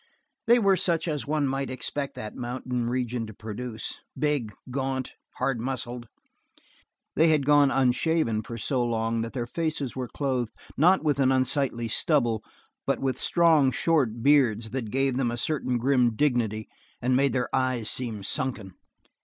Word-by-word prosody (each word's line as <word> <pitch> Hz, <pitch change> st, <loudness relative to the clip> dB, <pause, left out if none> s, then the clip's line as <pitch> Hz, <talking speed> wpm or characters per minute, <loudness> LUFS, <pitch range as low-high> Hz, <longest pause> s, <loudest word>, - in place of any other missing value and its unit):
They 240 Hz, +1 st, +7 dB
were 195 Hz, -4 st, +4 dB
such 170 Hz, -2 st, +1 dB
as 150 Hz, -3 st, -2 dB
one 150 Hz, -1 st, +1 dB
might 135 Hz, 0 st, -2 dB
expect 140 Hz, +2 st, -4 dB
that 110 Hz, -, -6 dB
mountain 125 Hz, -1 st, -3 dB
region 125 Hz, -2 st, -2 dB
to 110 Hz, -, -10 dB
produce, 110 Hz, +1 st, -5 dB, 0.2 s
big, 140 Hz, -6 st, 0 dB, 0.2 s
gaunt, 130 Hz, -1 st, -2 dB, 0.3 s
hard 135 Hz, -4 st, 0 dB
muscled. 120 Hz, -1 st, -4 dB, 1.1 s
They 160 Hz, -, +5 dB
had 155 Hz, -4 st, +3 dB
gone 145 Hz, -1 st, +5 dB
unshaven 130 Hz, -2 st, +1 dB
for 115 Hz, +2 st, -7 dB
so 125 Hz, +2 st, 0 dB
long 115 Hz, -1 st, 0 dB
that 115 Hz, 0 st, -5 dB
their 120 Hz, -3 st, -2 dB
faces 155 Hz, -1 st, -2 dB
were 130 Hz, -1 st, -3 dB
clothed 130 Hz, -4 st, -2 dB, 0.2 s
not 180 Hz, +6 st, +4 dB
with 145 Hz, -3 st, +1 dB
an 135 Hz, -1 st, +4 dB
unsightly 130 Hz, -2 st, +1 dB
stubble 120 Hz, -3 st, +1 dB, 0.4 s
but -, -, +2 dB
with 135 Hz, -1 st, -1 dB
strong, 165 Hz, -5 st, +4 dB
short 125 Hz, -8 st, +1 dB
beard 130 Hz, -6 st, +4 dB
that 125 Hz, -4 st, -3 dB
gave 135 Hz, +1 st, 0 dB
them 130 Hz, -3 st, +1 dB
a 120 Hz, -, -3 dB
certain 130 Hz, -2 st, -1 dB
grim 125 Hz, -2 st, +2 dB
dignity 115 Hz, -6 st, 0 dB, 0.3 s
and 125 Hz, +1 st, +1 dB
made 135 Hz, -1 st, +3 dB
their 125 Hz, -2 st, -1 dB
eyes 130 Hz, -4 st, 0 dB
seem 115 Hz, -6 st, -2 dB
sunken. 105 Hz, -3 st, -2 dB
130 Hz, 160 wpm, -26 LUFS, 120-140 Hz, 1.1 s, They